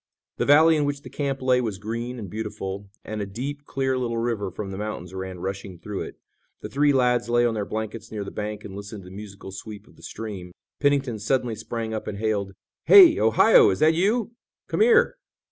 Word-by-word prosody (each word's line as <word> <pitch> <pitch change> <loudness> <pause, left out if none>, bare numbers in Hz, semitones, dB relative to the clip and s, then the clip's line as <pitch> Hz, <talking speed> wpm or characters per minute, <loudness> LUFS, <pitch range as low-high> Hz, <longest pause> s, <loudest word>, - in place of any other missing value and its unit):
The - - -1
valley 155 +3 +6
in 150 - +1
which 145 0 -3
the - - -11
camp 135 -2 -3
lay 125 -1 +3
was 110 -5 -3
green 115 +4 -5
and 105 -4 -6
beautiful, 100 -1 -5 0.2
and 110 -1 -4
a 100 - -3
deep, 140 +8 -6
clear 130 -2 -1
little 120 -2 -2
river 115 -4 -1
from 95 +2 -6
the 95 - -6
mountains, 100 -4 -5
ran 95 -1 -6
rushing, 95 0 -5
through 100 +3 -6
it. - - -7 0.5
The - - -6
three 145 +1 +3
lads 125 -3 +2
lay 120 0 +3
on 120 - +1
their 105 -2 -3
blankets 110 +1 -5
near 105 -2 -4
the 100 - -7
bank 105 0 -5
and 95 - -8
listened 100 0 -8
to 90 - -12
the - - -11
musical 100 -1 -9
sweep 105 +1 -9
of - - -21
the - - -18
stream. 100 -5 -7 0.3
Pennington 140 -6 +1
suddenly 120 +2 0
sprang 110 +1 -5
up 110 - -4
and 100 - -4
hailed: 100 -2 -1 0.3
"Hey, 360 -5 +9
Ohio, 460 -5 +6
is - - 0
that 155 +1 +4
you? 210 +7 +1 0.4
Come - - -1
here!" 475 +2 +5
110 Hz, 215 wpm, -24 LUFS, 100-135 Hz, 0.5 s, Hey